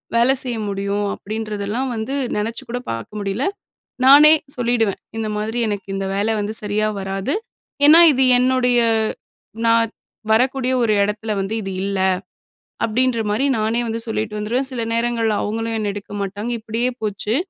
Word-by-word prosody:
வேல 240 Hz, +3 st, +5 dB
செய்ய 245 Hz, -3 st, -3 dB
முடியும் 200 Hz, +1 st, -2 dB
அப்டின்றதெல்லாம் 215 Hz, +3 st, -4 dB
வந்து 225 Hz, +5 st, -3 dB, 0.2 s
நெனச்சு 225 Hz, +2 st, -3 dB
கூட 245 Hz, +1 st, -3 dB
பார்க்க 115 Hz, -, -6 dB
முடியல. 200 Hz, +5 st, -2 dB, 0.6 s
நானே 290 Hz, +3 st, +9 dB, 0.2 s
சொல்லிடுவேன் 235 Hz, -4 st, 0 dB, 0.2 s
இந்த 220 Hz, -1 st, -2 dB
மாதிரி 220 Hz, +3 st, -3 dB
எனக்கு 200 Hz, -2 st, -4 dB
இந்த 195 Hz, 0 st, -2 dB
வேல 205 Hz, +2 st, 0 dB
வந்து 210 Hz, +1 st, -3 dB
சரியா 210 Hz, +1 st, 0 dB
வராது. 195 Hz, +6 st, -2 dB, 0.5 s
ஏன்னா, 310 Hz, +3 st, +9 dB
இது 265 Hz, -1 st, +2 dB
என்னுடைய 250 Hz, -1 st, +3 dB, 0.9 s
நான் 230 Hz, 0 st, +3 dB, 0.4 s
வரக்கூடிய 255 Hz, +2 st, +2 dB
ஒரு 220 Hz, -2 st, +2 dB
இடத்துல 210 Hz, +2 st, -3 dB
வந்து 195 Hz, +3 st, -2 dB
இது 195 Hz, -1 st, -5 dB
இல்ல 200 Hz, -1 st, -2 dB, 0.9 s
அப்டின்ற 240 Hz, +1 st, +1 dB
மாரி 220 Hz, +7 st, +1 dB
நானே 220 Hz, +2 st, 0 dB
வந்து 225 Hz, 0 st, -3 dB
சொல்லிட்டு 220 Hz, -1 st, -3 dB
வந்துருவேன். 240 Hz, +6 st, -1 dB
சில 250 Hz, -3 st, -3 dB
நேரங்கள்ல 230 Hz, -2 st, 0 dB
அவங்களும் 225 Hz, +2 st, -2 dB
என்னை 210 Hz, -2 st, -1 dB
எடுக்க 205 Hz, 0 st, -9 dB
மாட்டாங்க, 200 Hz, +4 st, -4 dB
இப்டியே 230 Hz, +3 st, -1 dB
போச்சு. 210 Hz, +1 st, -2 dB
220 Hz, 150 wpm, -20 LUFS, 205-245 Hz, 0.9 s, நானே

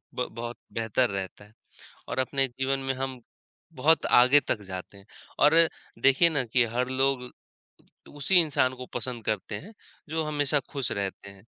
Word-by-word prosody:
ब 125 Hz, -, -1 dB
बहुत 120 Hz, +1 st, -5 dB, 0.2 s
बेहतर 115 Hz, +2 st, +1 dB
रहता 95 Hz, +1 st, -6 dB
है 105 Hz, -, -21 dB, 0.6 s
और -, -, -4 dB
अपने 135 Hz, +1 st, +1 dB
जीवन 130 Hz, +2 st, -2 dB
में 135 Hz, -, +1 dB
हम 130 Hz, -1 st, -5 dB, 0.5 s
बहुत 155 Hz, +4 st, +3 dB
आगे 130 Hz, +4 st, +6 dB
तक 105 Hz, -, -1 dB
जाते 95 Hz, +1 st, -8 dB
हैं। 100 Hz, -, -18 dB, 0.3 s
और 150 Hz, +2 st, +5 dB, 0.5 s
देखिए 135 Hz, +5 st, +5 dB
ना, 140 Hz, -5 st, 0 dB
कि 120 Hz, +2 st, +2 dB
हर 120 Hz, +2 st, -2 dB
लोग 130 Hz, -1 st, 0 dB, 0.9 s
उसी 145 Hz, +6 st, 0 dB
इंसान 130 Hz, -4 st, +1 dB
को 125 Hz, 0 st, -9 dB
पसंद 120 Hz, -4 st, -3 dB
करते 105 Hz, 0 st, -2 dB
हैं, 200 Hz, -, -10 dB, 0.4 s
जो 160 Hz, +1 st, -1 dB
हमेशा 145 Hz, -1 st, +2 dB
खुश 135 Hz, -4 st, -1 dB
रहते 100 Hz, 0 st, -4 dB
हैं। 100 Hz, +1 st, -17 dB
130 Hz, 165 wpm, -27 LUFS, 115-135 Hz, 0.9 s, आगे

